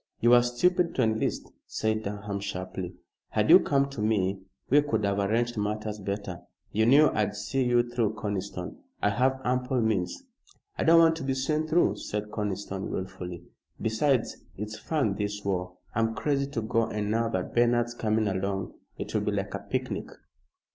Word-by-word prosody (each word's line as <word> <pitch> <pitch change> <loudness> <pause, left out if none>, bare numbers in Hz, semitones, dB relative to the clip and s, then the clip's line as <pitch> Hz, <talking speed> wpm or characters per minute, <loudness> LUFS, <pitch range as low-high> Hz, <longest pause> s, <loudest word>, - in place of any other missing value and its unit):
"You 120 - +4
were 120 0 +8
stupid 170 +9 +1
to 130 - +2
enlist," 110 0 -1 0.2
said 110 0 -1
Durham, 105 -1 -4
sharply. 90 -2 -5 0.3
"Had - - +2
you - - +11
come 140 -1 +2
to 120 - -5
me, 100 -3 +1 0.3
we 145 +3 +5
could 145 -7 0
have 100 0 +1
arranged 115 +4 0
matters 105 0 -2
better. 100 -2 -4 0.3
You 110 +2 +2
knew 145 +4 +6
I'd 105 -1 0
see 135 +5 -1
you 120 -1 +3
through, 115 -3 0
Conniston. 100 -4 -4 0.3
I 105 - +4
have 130 +4 +1
ample 125 +1 +1
means." 110 - 0 0.5
"I - - -1
don't 165 +1 +7
want 165 -1 +6
to 160 - -5
be 135 0 0
seen 155 +4 0
through," 165 +3 +3
said 105 0 -4
Conniston, 100 -2 -3
wilfully. 90 -2 -5 0.4
"Besides, 115 +3 +1 0.2
it's 105 +2 -5
fun, 135 -11 0
this 105 -1 -3
war. 90 -2 -2 0.2
I'm 115 0 +1
crazy 140 0 0
to 125 -6 -3
go, 115 +1 +1
and 105 -2 -2
now 115 +1 +1
that - - -3
Bernard's 120 0 +3
coming 110 -2 0
along 95 -1 -2 0.2
it - - -6
will - - +1
be - - -1
like - - -2
a - - -2
picnic." - - -3
110 Hz, 175 wpm, -28 LUFS, 100-125 Hz, 0.5 s, you